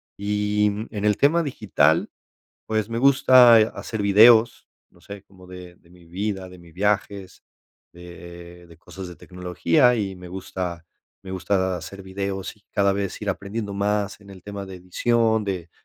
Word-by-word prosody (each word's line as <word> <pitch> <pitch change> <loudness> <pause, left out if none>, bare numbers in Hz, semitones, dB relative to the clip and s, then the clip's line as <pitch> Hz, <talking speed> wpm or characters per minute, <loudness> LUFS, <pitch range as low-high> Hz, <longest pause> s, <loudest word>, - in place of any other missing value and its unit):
y, 105 +1 0
mm, 105 +2 -6
en 105 -2 -4
el 105 -1 +2
tema 160 +4 +3
digital, 120 - +1 0.6
pues, 110 0 -2
me 115 - -2
gusta 130 -2 +6
hacer, 110 0 0
eh, - - -1
videos, 110 +3 +5 0.2
no - - -24
sé, 100 -1 -11
como 95 -2 -19
de 90 -1 -12
de 85 - -26
mi 90 -1 -19
vida, 95 +2 -4
de 90 - -13
mi 85 -1 -16
viajes, 100 0 -2 0.5
de 85 0 -12
de 85 -1 -17
cosas 95 +3 -10
de 90 - -11
tecnología, 90 - +1
y 100 -4 -3
me 90 0 -11
gusta 90 -2 -6 0.4
me 95 - -9
gusta 95 0 -1
hacer 85 +5 -10
videos 95 0 -5
y - - -27
cada 100 -1 +2
vez 100 -1 -4
ir 105 - -1
aprendiendo 100 +2 -5
más 100 0 -2
en 100 - -18
el 95 -1 -13
tema 100 -1 -7
de 95 - -9
edición, 110 +4 0
de 90 -4 -5
100 Hz, 175 wpm, -23 LUFS, 90-105 Hz, 0.6 s, gusta